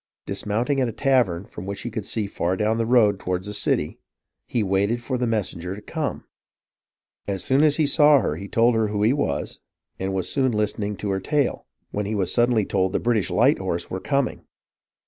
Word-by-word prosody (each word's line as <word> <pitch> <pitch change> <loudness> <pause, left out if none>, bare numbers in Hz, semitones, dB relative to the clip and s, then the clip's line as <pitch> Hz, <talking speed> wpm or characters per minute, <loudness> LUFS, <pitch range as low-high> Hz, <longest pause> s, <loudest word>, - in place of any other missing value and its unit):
Dismounting 120 +7 -1
at 125 - +1
a - - -6
tavern 115 -8 +1
from 95 - -9
which 100 0 -4
he 120 - -4
could 110 -2 -4
see 110 -2 -1
far 95 -2 -2
down 110 +2 +1
the 115 - 0
road 110 -5 +4
toward 90 -1 -2
the 105 +1 -6
city, - - 0 0.5
he 115 - 0
waited 100 +4 +1
for 130 +2 -3
the 125 -1 0
messen 110 -7 -1
ger 90 +3 -5
to 105 - -10
come. - - -4 1.0
As 100 -2 -2
soon 135 +3 +3
as 150 -2 +5
he 155 - +3
saw 145 0 +6
her 75 - -1
he 100 +5 -7
told 115 +4 +3
her 110 -1 +1
who 105 0 -1
he 115 +4 +4
was, 140 - -2 0.4
and 95 0 -2
was 90 -1 -1
soon 130 0 +1
listening 105 -1 -1
to 100 0 -3
her 95 - 0
tale, 145 +3 -1 0.2
when 105 -1 -2
he 110 - -2
was 95 -3 0
sud 120 0 +3
denly 110 -5 +1
told 95 -1 0
the - - +1
British 115 -6 +1
light - - +3
horse - - -3
were 95 - -3
coming. 140 +4 -1
105 Hz, 220 wpm, -23 LUFS, 95-125 Hz, 1.0 s, saw